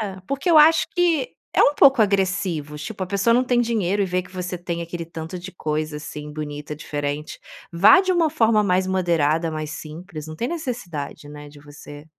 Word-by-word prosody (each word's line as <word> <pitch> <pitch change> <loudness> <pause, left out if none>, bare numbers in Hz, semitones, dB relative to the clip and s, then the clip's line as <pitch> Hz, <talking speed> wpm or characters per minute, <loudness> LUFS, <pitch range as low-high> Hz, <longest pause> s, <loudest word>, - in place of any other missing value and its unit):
É. 200 -3 -4
Porque 275 +5 -1
eu 320 - +7
acho 320 +2 +6
que 340 -7 +1 0.2
é - - +5
um 290 - +4
pouco 270 -5 +6
agressivo. 185 -7 -1
Tipo, 190 +6 -5
a - - -10
pessoa 200 +4 +1
não 250 +2 +3
tem 245 -1 +2
dinheiro 205 -4 0
e 195 - 0
vê 180 0 -1
que 180 - -16
você 180 -1 -4
tem 170 -1 -4
aquele 170 0 -6
tanto 165 +2 -7
de 185 +2 -9
coisa, 155 -2 -3
assim, 150 0 -8
bonita, 150 0 -6
diferente. 145 0 -5 0.3
Vá 195 - +7
de 375 -1 0
uma 335 -3 +2
forma 225 -7 +3
mais 185 -1 +1
moderada, 165 -4 +1
mais 155 -1 -5
simples, 155 +1 -8
não 155 - -8
tem 235 - -2
necessidade, 215 - -5
né, 145 0 -10
de 145 0 -15
você 145 0 -12
180 Hz, 200 wpm, -22 LUFS, 155-225 Hz, 0.3 s, eu